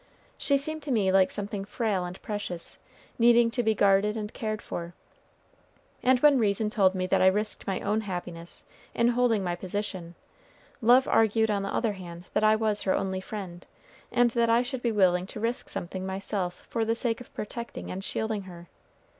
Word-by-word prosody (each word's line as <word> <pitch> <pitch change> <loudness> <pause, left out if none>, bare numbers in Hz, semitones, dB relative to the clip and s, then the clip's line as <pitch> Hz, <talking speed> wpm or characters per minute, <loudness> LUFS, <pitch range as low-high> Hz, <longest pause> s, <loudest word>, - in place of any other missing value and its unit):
She 280 - +2
seemed 310 +3 -4
to 290 - -5
me 205 -6 +2
like 190 -1 +5
something 205 -1 -4
frail 205 -3 -1
and 180 +1 -7
precious, 205 -5 -5 0.4
needing 235 0 +5
to 245 - 0
be 220 -2 +1
guarded 200 +2 +3
and 210 -1 -5
cared 215 -1 -3
for; 170 -3 -6 1.1
and 255 0 +4
when 290 -3 +6
reason 210 0 +1
told 195 -3 +3
me 185 0 -1
that 185 - +2
I 185 - +6
risked 210 +3 0
my 190 -1 -1
own 210 +2 0
happiness 175 -4 -6 0.3
in 235 0 +3
holding 240 -4 +2
my 175 -1 -1
position, 185 -2 -5 0.7
love 245 +3 +5
argued 220 0 +3
on 200 -1 0
the 195 - -3
other 225 -3 0
hand 175 -2 -9
that - - +1
I 215 0 +6
was 215 -1 0
her 190 - +1
only 190 -1 -2
friend, 190 -4 -7 0.5
and 240 -1 +3
that 235 0 +2
I 230 +2 +4
should 255 0 -5
be 235 - +1
willing 185 -3 +3
to 210 - -8
risk 235 +4 -2
something 185 +2 -4
myself 190 -1 -3
for 230 - -1
the 225 +1 +1
sake 235 0 0
of 250 - -13
protecting 235 +3 -6
and 190 +1 -5
shielding 220 0 -2
her. 175 -2 -11
210 Hz, 190 wpm, -28 LUFS, 190-230 Hz, 1.1 s, when